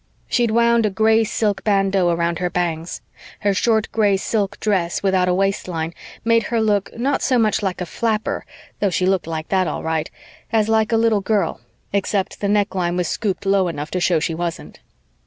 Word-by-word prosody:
She'd 240 -2 +1
wound 235 0 +3
a - - 0
gray 220 +3 +3
silk 210 -2 -1
bandeau 195 -3 +2
around 170 0 0
her 180 0 0
bangs. 170 -2 -2 0.4
Her 205 -1 +2
short 220 +2 +2
gray 205 -3 +2
silk 205 0 -2
dress 185 -5 0
without 190 -2 +2
a - - +3
waistline 180 -4 -1 0.3
made 230 0 +4
her 235 - 0
look, 210 -3 +1
not 265 +4 0
so 255 - +2
much 220 -2 +2
like 190 -3 -2
a - - -1
flapper, 220 +4 -2 0.4
though 200 - +2
she 180 0 0
looked 190 -3 +1
like 160 -1 -4
that 190 -2 +2
all 150 - -4
right, 160 -1 -1 0.4
as 215 -1 +2
like 220 0 +2
a 225 - +3
little 225 -2 +2
girl, 205 - 0 0.3
except 200 -1 -1
the 200 - 0
neckline 190 -4 0
was 180 - 0
scooped 200 -3 -2
low 195 -1 +3
enough 150 -3 -5
to 185 - -1
show 175 -2 +2
she 165 +1 -1
wasn't. 170 0 -5
195 Hz, 195 wpm, -20 LUFS, 180-220 Hz, 0.4 s, made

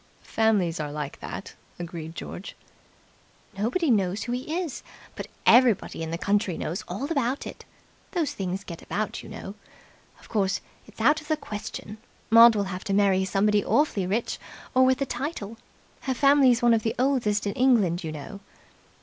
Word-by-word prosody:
"Families 205 -7 +1
are 150 -1 -3
like 150 -1 -5
that," - - -7 0.2
agreed 165 -2 -7
George. 185 - -7 1.0
"Nobody 250 - +1
knows 195 -2 +1
who 240 - -4
he 265 +7 -2
is, 330 -8 -4 0.3
but - - -6 0.2
everybody 235 -7 +4
in 160 - -3
the 165 - -2
county 200 -2 0
knows 170 +5 -3
all 260 - -4
about 275 -3 0
it. - - -9 0.5
Those 335 -6 0
things 190 0 -3
get 170 -4 -8
about, 215 +2 -3
you - - -11
know. 210 -2 -7 0.7
Of - - -17
course, 195 -3 0 0.3
it's - - -16
out 310 +1 +4
of 305 - -15
the 310 0 +1
question. 215 -3 -7 0.3
Maud 230 0 +9
will 205 - +1
have 180 - -6
to 195 - -1
marry 195 -2 +3
somebody 205 +1 +2
awfully 220 -11 +1
rich 220 +5 -1 0.3
or 260 0 +5
with 260 +1 +2
a - - -2
title. 240 -5 -5 0.4
Her 260 -1 -2
family's 275 -3 +5
one 240 -1 +6
of 225 - +2
the 225 0 -2
oldest 245 -6 +1
in 200 - -1
England, 210 -10 +3
you 160 - -4
know." 155 +7 -8
215 Hz, 175 wpm, -26 LUFS, 190-255 Hz, 1.0 s, Maud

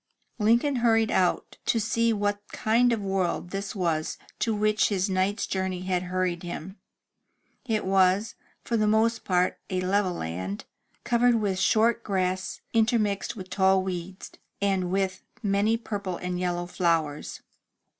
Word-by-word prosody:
Lincoln 235 +6 +3
hurried 225 -2 +3
out 180 -1 0
to 230 - +3
see 230 +1 +1
what 205 -1 0
kind 240 +3 +2
of 225 -3 0
a - - -4
world 185 -2 -1
this 195 +1 -4
was 165 -5 -1 0.2
to 230 - +1
which 215 0 +2
his 195 -1 0
night's 190 +3 0
journey 190 -1 -2
had 185 -1 0
hurried 180 -2 -1
him. 175 +2 -7 0.9
It 220 -4 -1
was, 190 +2 +3 0.3
for 235 - 0
the 215 -1 +2
most 225 +2 +2
part 180 -1 +1
a 185 - -1
level 185 0 +1
land, 95 - -5 0.4
covered 240 0 +3
with 200 -4 0
short 230 +4 +3
grass 185 -2 -1
intermixed 220 -3 +1
with 185 -3 -9
tall 190 -1 +3
weeds, 185 0 -6 0.3
and 195 -3 0
with 190 0 -1 0.2
many 205 +2 +2
purple 200 -5 -4
and 180 0 -3
yellow 175 -1 -1
flowers. 165 -5 -1
195 Hz, 145 wpm, -27 LUFS, 185-220 Hz, 0.9 s, Lincoln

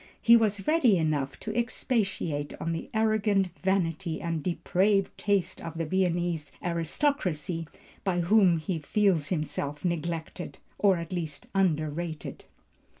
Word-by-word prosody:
He 235 - +7
was 210 -3 +2
ready 290 - +4
enough 150 -4 -1
to 215 -1 -4
expatiate 195 - -1
on 165 - -2
the 165 - -4
arrogant 215 -3 +2
vanity 180 -3 0
and 165 -2 -2
depraved 190 +4 +1
taste 200 -3 0
of 165 -1 -6
the 165 - -1
Viennese 175 -3 0
aristocracy, 170 - -1 0.4
by 180 -2 +1
whom 185 -1 +5
he 160 +2 -2
feels 175 -1 +2
himself 150 -2 -3
neglected, 170 0 -3 0.2
or 195 -3 +4
at 170 +1 -5
least 160 -5 -4
underrated." 160 -4 -1
175 Hz, 125 wpm, -28 LUFS, 160-200 Hz, 0.4 s, He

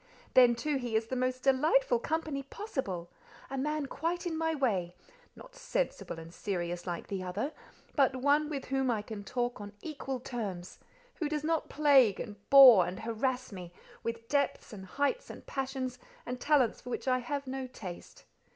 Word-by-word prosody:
Then 245 -2 +7
too 295 +4 -1
he 240 -4 -3
is 220 +1 +2
the 255 - -4
most 255 0 -1
delightful 270 -2 +3
company 310 0 -2
possible—a 265 - -6
man 300 +1 -1
quite 335 +6 -2
in 340 -2 -2
my 320 0 0
way; 190 - 0 0.4
not - - -14
sensible - - -2
and 165 +1 -10
serious 175 -3 -3
like 175 -1 -3
the 195 -2 -4
other; 200 - -3 0.4
but 270 -2 +4
one 285 +3 +2
with 280 -3 -4
whom 270 -1 0
I 220 -3 0
can 210 -1 -7
talk 245 0 -2
on 205 0 -8
equal 270 -4 -4
terms—who 245 - -6
does 300 -1 -2
not 320 0 0
plague 275 -8 +5
and 210 -4 -5
bore, 250 -10 +10
and 185 +1 -5
harass 250 +3 -1
me 180 -3 -8 0.3
with 230 0 -4
depths, 280 -4 0
and 190 -2 -9
heights, 285 - -1
and - - -10
passions, 265 -2 -3 0.3
and 250 0 -5
talents 280 -7 +3
for - - -9
which 250 - -4
I 255 0 +3
have 280 +3 -3
no 260 0 -4
taste. 190 -8 -10
255 Hz, 170 wpm, -31 LUFS, 215-285 Hz, 0.4 s, bore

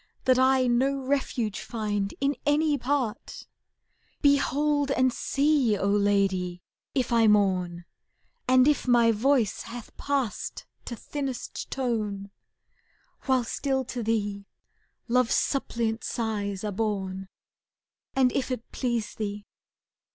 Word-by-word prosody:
That 255 -1 +4
I 260 0 +4
no 265 +3 +1
refuge 255 -6 -1
find 205 -3 -2
in 280 +1 +1
any 295 +1 +2
part? 260 -5 -2 0.8
Behold 285 0 +2
and 255 -2 +2
see, 280 -6 +2
O 195 - -1
Lady! 195 -3 +1 0.3
if 255 -3 0
I 230 -1 +5
mourn. 185 -4 +2 0.6
And 255 +1 +5
if 295 -3 +2
my 240 -2 +5
voice 230 -1 +1
hath 235 -1 -9
passed 275 -6 -2 0.2
to 240 - -5
thinnest 270 +1 -5
tone, 210 -6 -2 0.9
^<* - - -19
While 260 -2 +3
still 265 +2 -1
to 245 0 -5
thee 205 -3 -2 0.6
love's 250 0 +2
suppliant 230 -5 -1
sighs 205 -4 -3
are 210 - -2
borne, 195 -2 -2 0.9
And 260 -2 +4
if 270 - -1
it 250 -3 -5
please 235 -4 -2
thee. 205 -1 -5
235 Hz, 120 wpm, -27 LUFS, 205-265 Hz, 0.9 s, I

